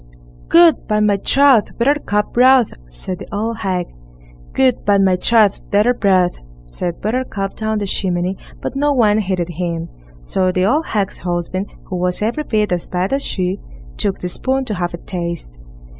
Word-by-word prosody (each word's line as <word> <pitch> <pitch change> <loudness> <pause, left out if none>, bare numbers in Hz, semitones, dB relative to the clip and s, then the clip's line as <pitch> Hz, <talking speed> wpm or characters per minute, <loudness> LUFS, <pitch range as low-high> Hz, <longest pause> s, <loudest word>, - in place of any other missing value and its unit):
Good, 335 -2 +5
by 210 -1 +1
my 210 -1 +3
troth! 270 +1 +3
Buttercup 235 -5 0
broth, 255 -1 +5 0.2
said 175 - -6
the - - -9
old 220 +2 -2
hag. 185 -2 -1 0.7
Good, 260 -2 +2
by 205 -1 +3
my 190 -2 +3
troth! 215 +1 +3
Daughter 210 +5 +3
broth, 185 -6 +2 0.3
said 170 - -5
Buttercup 215 -3 -2
down 220 0 -2
the 205 - -2
chimney, 185 -1 -1 0.3
but - - -4
no 290 +1 +2
one 215 -5 +3
heeded 185 -4 -2
him. 170 -1 -4 0.3
So 185 - 0
the 185 0 +1
old 295 +10 +1
hag's 200 -3 -2
husband, 180 +2 -3 0.2
who 185 - -5
was 180 +3 0
every 240 +8 -1
bit 210 -3 0
as 175 -1 -2
bad 185 +5 -1
as 275 0 0
she, 185 +1 -2 0.4
took 195 - 0
the 180 - -4
spoon 265 +7 -1
to 215 - -3
have 175 -2 -3
a - - -9
taste. 170 - -6
200 Hz, 175 wpm, -18 LUFS, 180-230 Hz, 0.7 s, Good